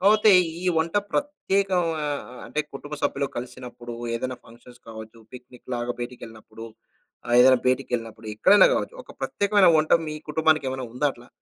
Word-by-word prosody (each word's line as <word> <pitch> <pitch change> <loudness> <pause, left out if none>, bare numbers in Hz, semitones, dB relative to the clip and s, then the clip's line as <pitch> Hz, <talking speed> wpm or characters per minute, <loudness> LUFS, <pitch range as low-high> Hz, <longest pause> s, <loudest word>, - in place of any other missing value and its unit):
కాపోతే 210 +2 +5 0.3
ఈ - - -6
వంట 165 +1 -2 0.2
ప్రత్యేకా 200 -10 0 0.3
ఆహ్, 145 -1 -2 0.3
అంటే 150 - -2
కుటుంబ 145 +2 -7
సభ్యులు 140 0 0
కలిసినప్పుడు, 125 -1 -8 0.2
ఏదైనా 130 +2 -3
ఫంక్షన్స్ 120 +1 -17
కావచ్చు. 110 0 -10
పిక్నిక్ 125 0 -14
లాగా 120 0 -2
బయటకెళ్ళినప్పుడు! 115 -2 -9 0.6
ఆహ్, 120 - 0
ఏదైనా 130 0 +6
బయటకెళ్ళినప్పుడు 115 -4 -2
ఎక్కడైనా 205 - +6
గావచ్చు. - - -3
ఒక - - -13
ప్రత్యేకమైన 200 -3 +3
వంట 155 0 0 0.2
మీ 155 - -5
కుటుంబానికి 155 -1 +2
ఏమైనా 130 -1 -5
ఉందా 145 +4 +1
అట్లా. 120 +1 -17
130 Hz, 145 wpm, -24 LUFS, 120-155 Hz, 0.6 s, ఏదైనా